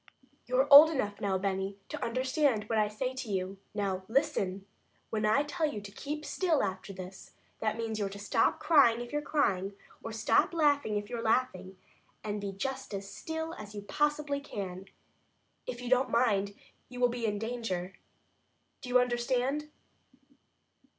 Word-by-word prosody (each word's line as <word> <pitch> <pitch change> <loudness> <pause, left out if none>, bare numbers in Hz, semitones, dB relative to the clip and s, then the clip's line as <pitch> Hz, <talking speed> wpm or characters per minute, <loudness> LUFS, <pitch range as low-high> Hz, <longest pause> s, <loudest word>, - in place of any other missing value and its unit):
"You're 255 +2 +2
old 300 +3 +12
enough 210 -10 -2
now, 195 -2 +1
Benny, 195 0 -2
to - - -5
understand 255 -1 +1
what 220 +1 0
I 210 - +3
say 250 +5 -3
to 260 -3 -6
you. 190 0 -2 0.2
Now, 195 -2 -1
listen! 220 -8 0 0.5
When 215 -1 0
I 245 +7 +4
tell 300 +1 -1
you 210 - -5
to 200 -1 -10
keep 295 +7 -5
still 340 -6 +1
after 190 +1 -4
this, 185 0 -10 0.3
that 215 0 -1
means 225 -1 -3
you're 200 -1 -1
to 200 - -9
stop 200 0 +1
crying 270 -8 +5
if 240 +2 -8
you're 295 - 0
crying, 200 -11 0 0.3
or 225 - -6
stop 220 +9 +2
laughing 285 -9 +2
if 205 0 -4
you're 235 +1 -4
laughing, 205 -5 0 0.5
and 210 -1 -3
be 200 -1 -3
just 265 +3 -4
as 195 0 -5
still 320 +10 -5
as 210 0 -9
you 205 - -6
possibly 295 +4 0
can. 195 -8 -6 0.8
If 245 0 -5
you - - -5
don't 255 +1 +4
mind, 200 -4 +2 0.3
you 250 0 -8
will 250 - +5
be 240 -1 -2
in 210 -1 -1
danger. 220 -5 -3 0.9
Do 250 - -7
you 250 0 +5
understand?" 250 +4 0
225 Hz, 170 wpm, -31 LUFS, 200-270 Hz, 0.9 s, old